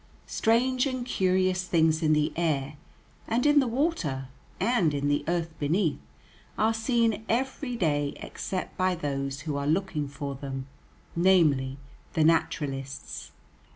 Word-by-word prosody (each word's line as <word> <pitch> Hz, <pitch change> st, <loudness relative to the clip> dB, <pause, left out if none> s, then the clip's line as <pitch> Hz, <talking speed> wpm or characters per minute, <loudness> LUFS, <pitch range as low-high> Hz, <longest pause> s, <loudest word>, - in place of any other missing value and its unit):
Strange 250 Hz, +4 st, +2 dB
and 255 Hz, -2 st, -3 dB
curious 185 Hz, -4 st, +1 dB
things 160 Hz, -2 st, +3 dB
in 155 Hz, -1 st, +3 dB
the 150 Hz, +1 st, +1 dB
air, 150 Hz, -4 st, 0 dB, 0.5 s
and 240 Hz, +4 st, +1 dB
in 295 Hz, 0 st, +6 dB
the 265 Hz, -, +2 dB
water, 225 Hz, -, -1 dB, 0.3 s
and 185 Hz, -11 st, +2 dB
in 145 Hz, 0 st, 0 dB
the 145 Hz, -, +1 dB
earth 170 Hz, -1 st, -1 dB
beneath, 160 Hz, +3 st, +1 dB, 0.6 s
are 220 Hz, +1 st, +3 dB
seen 225 Hz, -1 st, +1 dB
every 260 Hz, +2 st, -1 dB
day 145 Hz, -8 st, 0 dB
except 185 Hz, -1 st, -5 dB
by 185 Hz, 0 st, +2 dB
those 140 Hz, -3 st, -3 dB
who 150 Hz, -1 st, -3 dB
are 140 Hz, 0 st, -2 dB
looking 160 Hz, -3 st, 0 dB
for 140 Hz, 0 st, -5 dB
them, 135 Hz, -1 st, -5 dB, 0.5 s
namely, 155 Hz, -7 st, +3 dB, 0.4 s
the 160 Hz, -, +3 dB
naturalists. 145 Hz, -4 st, -1 dB
165 Hz, 135 wpm, -28 LUFS, 145-220 Hz, 0.6 s, in